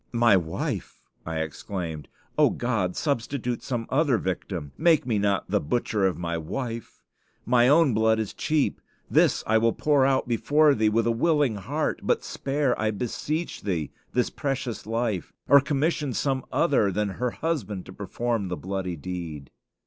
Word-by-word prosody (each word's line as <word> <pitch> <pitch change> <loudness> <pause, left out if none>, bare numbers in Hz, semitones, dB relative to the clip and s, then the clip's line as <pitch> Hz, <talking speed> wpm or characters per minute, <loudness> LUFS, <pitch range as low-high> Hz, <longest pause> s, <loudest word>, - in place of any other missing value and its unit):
"My 115 -3 +5
wife!" 85 -3 -3 0.3
I 80 -1 -2
exclaimed: 80 0 -5 0.3
"O - - +5
God! 110 -7 -1
substitute 125 -3 -2
some 120 -3 -3
other 140 -2 +3
victim. 90 -5 -4
Make 160 -4 +3
me 115 -4 +1
not 100 -1 +1
the - - +3
butcher 105 +3 0
of 95 - -2
my 85 -1 -2
wife. 115 - -5 0.4
My 120 0 +4
own 145 -1 +5
blood 110 +1 +3
is 110 -2 -3
cheap. 155 -2 0 0.3
This - - +3
will 110 +1 +4
I - - -31
pour 145 -3 +3
out 135 -1 +2
before 145 +5 +4
Thee 110 -3 +2
with 115 +1 +1
a 115 - +3
willing 145 -2 +2
heart; 140 +11 -2
but - - +1
spare, 140 -1 0
I 110 - +2
beseech 135 - -3
Thee, 85 -8 -2 0.2
this 125 0 +1
precious 135 -6 -3
life, 115 -4 -2
or 140 0 +7
commission 145 -1 0
some 135 -2 0
other 135 -11 +2
than 105 +2 0
her 125 +6 -2
husband 115 - -3
to - - -10
perform 115 -4 -2
the 90 - -3
bloody 95 -1 -3
deed." 80 -4 -6
115 Hz, 165 wpm, -26 LUFS, 95-135 Hz, 0.4 s, or